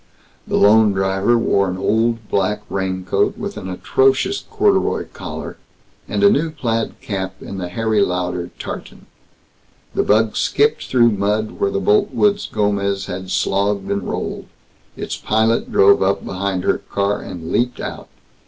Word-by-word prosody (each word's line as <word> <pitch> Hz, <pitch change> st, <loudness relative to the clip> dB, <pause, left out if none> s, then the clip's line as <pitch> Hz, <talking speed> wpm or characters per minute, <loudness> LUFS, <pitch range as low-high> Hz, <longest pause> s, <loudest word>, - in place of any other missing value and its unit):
The -, -, 0 dB
lone 105 Hz, 0 st, +5 dB
driver 95 Hz, +4 st, +2 dB
wore 100 Hz, -4 st, +2 dB
an 90 Hz, -, -3 dB
old 110 Hz, +3 st, 0 dB
black 105 Hz, +2 st, 0 dB
raincoat 95 Hz, -1 st, -1 dB
with -, -, -5 dB
an 95 Hz, -3 st, -6 dB
atrocious 135 Hz, -, +1 dB
corduroy 415 Hz, -3 st, +1 dB
collar, -, -, -7 dB, 0.5 s
and 205 Hz, -, -1 dB
a 200 Hz, -, +8 dB
new 160 Hz, -3 st, +1 dB
plaid 115 Hz, -7 st, -2 dB
cap 95 Hz, -2 st, -4 dB
in 100 Hz, -, -7 dB
the 90 Hz, -1 st, -4 dB
Harry 110 Hz, +2 st, 0 dB
Lauder 90 Hz, -2 st, -1 dB
tartan. -, -, -8 dB, 0.9 s
The -, -, +1 dB
bug 110 Hz, +1 st, +2 dB
skipped 440 Hz, +1 st, +1 dB
through 120 Hz, -2 st, +4 dB
mud 105 Hz, +2 st, 0 dB
where 100 Hz, -, +2 dB
the 100 Hz, -, -1 dB
Boltwoods' 205 Hz, -, +2 dB
Gomez 100 Hz, -2 st, 0 dB
had 95 Hz, +1 st, -6 dB
slogged 100 Hz, +1 st, 0 dB
and 100 Hz, 0 st, 0 dB
rolled. -, -, -4 dB, 0.5 s
Its -, -, -4 dB
pilot 110 Hz, +2 st, +1 dB
drove 100 Hz, +1 st, +5 dB
up 95 Hz, +1 st, +1 dB
behind 95 Hz, -1 st, -2 dB
her -, -, +1 dB
car, 100 Hz, +1 st, -2 dB
and 85 Hz, -2 st, -7 dB
leaped 125 Hz, +1 st, 0 dB
out. -, -, -6 dB
100 Hz, 150 wpm, -19 LUFS, 95-115 Hz, 0.9 s, a